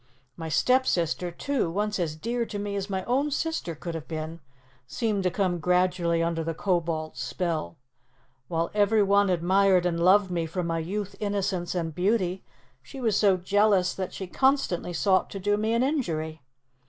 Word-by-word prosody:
My 165 -1 -6
stepsister, 180 -4 +2
too, 245 +3 -1
once 210 +3 -1
as 160 -3 -1
dear 235 +8 -2
to 210 - -5
me 205 0 -3
as 200 0 -3
my 190 -1 -2
own 270 +7 +1
sister 295 - -2
could 170 +3 -6
have 160 -5 -6
been, 160 +2 -5 0.5
seemed 205 - -1
to 185 - +1
come 180 -1 0
gradually 180 -1 +2
under 165 -1 -1
the 165 0 -3
Kobold's 165 -4 -1
spell. 165 -3 -3 0.7
While 165 0 -1
every 210 +1 +3
one 200 0 +3
admired 185 +1 +3
and 170 -1 0
loved 190 +1 +5
me 170 -2 -1
for 180 +3 -3
my 165 -1 -1
youth, 200 +4 -4
innocence, 195 -4 -1
and 165 -2 -2
beauty, 185 0 0 0.4
she 270 - -10
was 225 -5 +1
so 200 -3 +4
jealous 195 0 +2
that 185 -1 -4
she 190 - -6
constantly 265 -5 +1
sought 185 +2 +2
to 195 - -6
do 205 +2 +1
me 215 +2 0
an 235 +2 +2
injury. 160 - -2
185 Hz, 175 wpm, -27 LUFS, 170-205 Hz, 0.7 s, loved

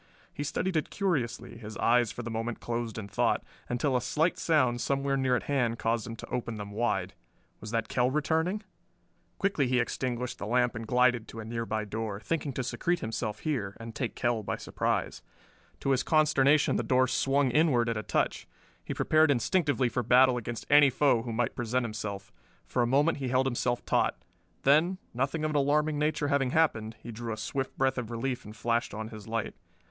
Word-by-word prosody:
He 145 - -4
studied 170 +5 -2
it 155 - 0
curiously, 150 - -2
his 110 -2 -8
eyes 120 -2 +3
for 120 - -6
the 115 - -5
moment 115 +1 -3
closed 115 -1 -3
in 105 -2 -5
thought, - - +1 0.3
until 130 +2 0
a 125 - +2
slight 155 +7 0
sound 130 -7 +2
somewhere 140 0 0
near 130 -2 +2
at - - -1
hand 125 -5 0
caused 115 -1 -1
him 115 - -6
to - - -10
open 115 -2 -3
them 105 -1 -7
wide. 100 -4 -1 0.5
Was 105 - -8
the 115 0 0
Kell 125 +2 +1
returning? 160 +8 0 0.7
Quickly 195 -9 +1
he 125 0 +2
extinguished 125 +1 -2
the 100 - -4
lamp 125 +1 +2
and 115 0 -6
glided 125 -1 +3
to 115 - -9
a 110 - -6
nearby 115 -1 -3
door, 105 -1 -4
thinking 150 +5 -2
to 130 - -2
secrete 175 +7 -1
himself 110 -1 -3
here, 115 -11 -2
and 115 0 -8
take 120 +1 -3
Kell 120 -3 0
by 105 - -3
surprise. - - -2 0.6
To 135 - +1
his 130 -1 +3
consternation 150 -2 +3
the - - +1
door 130 0 +3
swung 135 0 +2
inward 130 -5 +3
at 115 - 0
a 110 - -2
touch. - - -1 0.4
He - - -5
prepared 155 0 +4
instinctively 145 -1 +2
for 120 +1 -1
battle 125 +2 +5
against 120 -1 -5
any 145 -1 +7
foe 130 -2 +3
who 115 0 -5
might 115 +1 -1
present 120 +1 0
himself. 105 -3 -5 0.3
For 125 - 0
a 120 - +2
moment 145 +5 +2
he 135 - -2
held 130 +1 +2
himself 120 -1 -1
taut; - - +1 0.5
then, 155 +7 +4 0.2
nothing 135 +6 -1
of 155 - 0
an 150 - +1
alarming 150 +2 +2
nature 150 -1 0
having 140 -2 +2
happened, 115 -8 +1
he 120 - -7
drew 115 +1 -5
a 110 - -4
swift 135 +4 -3
breath 130 -1 +1
of 115 -3 -5
relief 125 +2 -3
and 105 +1 -10
flashed 115 -1 -1
on 110 0 -5
his 110 -2 -10
light. 115 -1 -2
125 Hz, 200 wpm, -29 LUFS, 115-140 Hz, 0.7 s, any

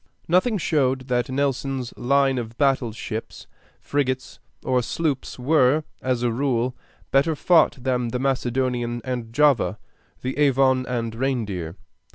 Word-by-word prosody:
Nothing 185 +7 +3
showed 135 -6 0
that 125 0 0
Nelson's 135 -2 -1
line 135 0 +2
of 115 0 -7
battle 135 -5 +2
ships, 110 0 -6 0.3
frigates, 130 -2 -2 0.2
or 130 -1 +2
sloops 145 +2 -2
were, 145 +2 +3 0.2
as 125 -2 -1
a 120 - +2
rule, 125 0 0 0.4
better 140 +4 +3
fought 160 -1 +4
than 125 -1 0
the 120 +2 -2
Macedonian 125 -2 -1
and 120 -3 -4
Java, 120 -8 +3 0.5
the 130 +3 -3
Avon 130 -2 +3
and 115 -3 -2
Reindeer. 110 -10 -2
130 Hz, 130 wpm, -23 LUFS, 120-140 Hz, 0.5 s, fought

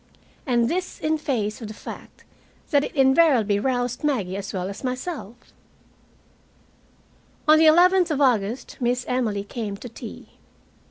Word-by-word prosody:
And 240 -2 +2
this 365 +6 -3
in 310 0 0
face 225 -7 -2
of 225 - -6
the 215 - -9
fact - - -10 0.5
that 285 -2 +4
it - - -6
invariably 265 -7 +4
roused 245 +1 -1
Maggie 220 -11 0
as 200 +1 -5
well 185 -2 -3
as 200 +5 -8
myself. 255 - -6 1.9
On 310 +1 +7
the 320 - +6
eleventh 355 +3 +5
of 300 -3 -1
August 240 -3 0
Miss 245 0 0
Emily 225 -6 -1
came 205 -1 -5
to 245 - -9
tea. 230 - -10
250 Hz, 145 wpm, -23 LUFS, 215-295 Hz, 1.9 s, On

